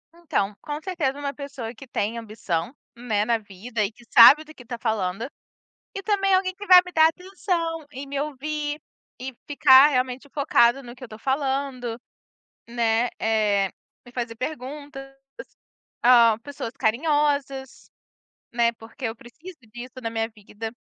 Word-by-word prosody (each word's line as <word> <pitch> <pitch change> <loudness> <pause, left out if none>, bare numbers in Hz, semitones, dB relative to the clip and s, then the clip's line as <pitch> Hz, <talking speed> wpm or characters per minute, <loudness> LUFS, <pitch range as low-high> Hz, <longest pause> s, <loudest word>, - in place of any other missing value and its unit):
Então, 210 -12 -2
com 295 +1 -5
certeza 310 -7 -2
uma 280 -1 -3
pessoa 275 -5 -7
que 255 +3 -13
tem 230 -1 -2
ambição, 215 - -4 0.2
né, 220 -4 -1
na 235 0 +2
vida 210 +2 -5
e 205 - -2
que 240 - -20
sabe 275 +6 +9
do 310 0 -14
que 250 - -14
está 240 0 -6
falando, 220 0 -2 0.6
e 395 - -6
também 395 -2 +1
alguém 370 0 +2
que 410 +2 -10
vai 365 -1 +10
me 360 - -9
dar 315 -1 +6
atenção 340 -2 -3
e 270 +1 -7
me 275 0 -4
ouvir, 300 +1 -3 0.4
e 260 0 -6
ficar 275 -1 +7
realmente 255 -1 -1
focado 275 -3 +3
no 240 - -10
que 250 - -20
eu - - -5
estou 215 -2 -11
falando, 265 -2 -2 0.7
né, 235 0 +1
eh, 210 -3 +1 0.3
me 245 - -14
fazer 240 -2 -4
perguntas, 270 +2 -7 0.9
ah, 235 -3 +6
pessoas 280 -5 -6
carinhosas, 275 +1 0 0.6
né, 235 0 +3
porque 230 +3 -8
eu 225 0 -4
preciso 315 +10 -13
disso 245 +1 -9
na 230 - -3
minha 225 0 -1
vida. 215 0 -8
255 Hz, 155 wpm, -24 LUFS, 230-295 Hz, 0.9 s, vai